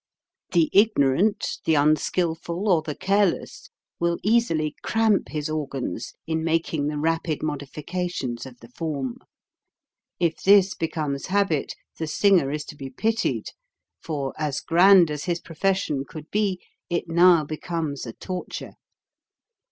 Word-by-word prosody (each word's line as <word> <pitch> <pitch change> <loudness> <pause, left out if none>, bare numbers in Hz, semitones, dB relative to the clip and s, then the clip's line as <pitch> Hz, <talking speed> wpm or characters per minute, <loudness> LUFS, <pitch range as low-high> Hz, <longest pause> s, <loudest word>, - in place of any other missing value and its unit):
The 170 -3 +3
ignorant, 200 -1 +3
the 160 - +3
unskilful, 165 +5 +1
or 175 -5 +4
the 155 -2 -5
careless 200 - 0 0.3
will 170 0 +1
easily 195 -9 +2
cramp 220 -3 +1
his 150 -1 -3
organs 150 -4 -4
in 160 0 -1
making 160 -2 0
the 150 0 -2
rapid 160 0 -1
modifications 145 -3 -4
of 125 -2 -14
the 115 - -12
form. 140 -3 -4 1.0
If 170 -2 0
this 195 -1 +5
be 165 - -2
comes 150 -4 -3
habit, 190 -6 0 0.2
the 160 - -2
singer 175 -2 +3
is 150 +1 -3
to - - -10
be 135 -2 -7
pitied, 225 - -1 0.5
for, 140 -4 -3
as 150 -3 -1
grand 180 -1 +6
as 150 -1 -4
his 175 -1 -1
profession 165 -4 -1
could 155 +2 -11
be, 205 -3 0 0.3
it 170 0 -1
now 170 -1 +5
becomes 155 -2 -4
a 115 - -6
torture. 185 -1 -6
165 Hz, 135 wpm, -24 LUFS, 150-185 Hz, 1.0 s, grand